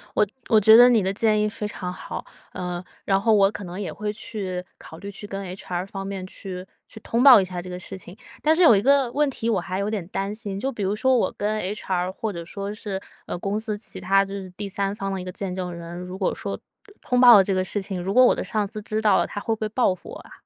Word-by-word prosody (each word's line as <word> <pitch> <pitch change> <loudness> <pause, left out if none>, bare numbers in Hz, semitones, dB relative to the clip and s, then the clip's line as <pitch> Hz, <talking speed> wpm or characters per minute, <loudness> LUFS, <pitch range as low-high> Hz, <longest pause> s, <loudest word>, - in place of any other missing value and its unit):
我 210 - +4 0.2
我 220 - +6
觉 220 +2 +8
得 245 +2 +9
你 235 -3 +4
的 190 - +1
建 215 0 +2
议 210 - +2
非 210 -1 -4
常 180 -3 -5
好， 180 - -7 0.3
呃， 180 0 -4 0.2
然 195 -1 +2
后 220 +2 +3
我 200 -1 +5
可 205 - -7
能 180 +2 -7
也 200 - -4
会 210 0 -3
去， 190 -4 -5
考 160 - -12
虑 200 +3 -8
去 205 +1 -9
跟 195 0 -5
HR 180 -2 -4
方 195 -1 -6
面 195 -1 -5
去 185 -1 -7 0.2
去 220 - -11
通 235 - 0
报 265 -5 +10
一 - - -1
下 180 -1 -5
这 180 - -9
个 180 - -5
事 190 +1 -8
情。 185 +1 -11 0.2
但 315 +1 +4
是 360 - +2
有 275 -10 +8
一 195 - +2
个 270 0 +3
问 295 +1 +2
题 230 -3 -3
我 205 - +2
还 185 +2 -4
有 200 +1 -1
点 205 -6 -3
担 195 +1 -3
心， 205 -3 -5
就 270 +6 -1
比 230 - -7
如 195 +2 0
说 260 +4 +3
我 240 - +1
跟 215 +1 -1
HR 185 -2 -2
或 220 +3 -4
者 170 -1 -6
说 200 +3 -5
是， 205 -3 -5 0.3
呃， - - -4
公 200 +3 -2
司 220 -1 -3
其 200 -3 -8
他， 195 +2 +3
就 195 - -8
是 195 -2 -6
第 200 +3 -6
三 195 +1 -2
方 195 -1 -3
的 195 - -3
一 - - -6
个 185 - -6
见 190 0 -4
证 180 -1 -4
人， 170 0 -8
如 180 +1 -7
果 190 - 0
说 - - -5 0.4
通 250 - 0
报 245 -1 +10
了 200 - +7
这 195 - -1
个 185 0 +1
事 200 +2 -2
情， 190 -2 -4
如 190 +2 -2
果 255 +3 +7
我 - - +5
的 - - -3
上 215 -2 -1
司 215 +1 -6
知 215 +1 -2
道 210 -3 +4
了， - - +2
他 - - -5
会 225 - -1
不 220 - -24
会 215 - -1
报 220 -3 +2
复 185 - -13
我 - - -8
啊？ - - -15
200 Hz, 310 characters per minute, -24 LUFS, 185-215 Hz, 0.4 s, 报